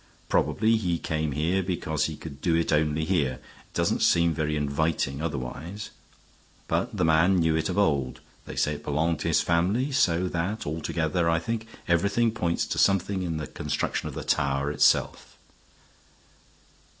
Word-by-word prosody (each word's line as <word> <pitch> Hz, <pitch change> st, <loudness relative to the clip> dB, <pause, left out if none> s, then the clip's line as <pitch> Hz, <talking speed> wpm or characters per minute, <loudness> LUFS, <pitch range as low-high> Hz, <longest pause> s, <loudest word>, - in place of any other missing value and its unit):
Probably 110 Hz, +1 st, +2 dB
he 90 Hz, -6 st, -1 dB
came 80 Hz, -2 st, -2 dB
here 85 Hz, +7 st, +1 dB
because 85 Hz, -4 st, -1 dB
he 80 Hz, -, -3 dB
could 70 Hz, -3 st, -10 dB
do 85 Hz, -2 st, +2 dB
it 85 Hz, -1 st, +1 dB
only 75 Hz, +1 st, +1 dB
here; 80 Hz, -7 st, +1 dB
it 65 Hz, -, -18 dB
doesn't -, -, +1 dB
seem 85 Hz, -1 st, +3 dB
very 75 Hz, -1 st, -1 dB
inviting 75 Hz, -1 st, -1 dB
otherwise. 80 Hz, +7 st, -5 dB, 0.8 s
But 95 Hz, +7 st, -1 dB
the 90 Hz, -, +2 dB
man 80 Hz, +4 st, +4 dB
knew 80 Hz, -3 st, +2 dB
it 80 Hz, +5 st, 0 dB
of 90 Hz, -, -3 dB
old; 70 Hz, -10 st, +1 dB, 0.3 s
they -, -, -7 dB
say 75 Hz, -, +1 dB
it 75 Hz, 0 st, -8 dB
belonged 80 Hz, +2 st, 0 dB
to -, -, -3 dB
his -, -, +3 dB
family, 95 Hz, +11 st, +1 dB
so 90 Hz, -9 st, +2 dB
that 90 Hz, +6 st, -2 dB
altogether, 80 Hz, +2 st, -1 dB
I 85 Hz, -, +3 dB
think, 110 Hz, +7 st, -3 dB, 0.2 s
everything 100 Hz, +7 st, +2 dB
points 85 Hz, -6 st, -1 dB
to -, -, -3 dB
something 100 Hz, 0 st, +2 dB
in 85 Hz, -3 st, -2 dB
the 75 Hz, -, -4 dB
construction -, -, -3 dB
of -, -, -9 dB
the -, -, -5 dB
tower 70 Hz, +1 st, 0 dB
itself." 75 Hz, -, +1 dB
85 Hz, 165 wpm, -26 LUFS, 75-95 Hz, 0.8 s, man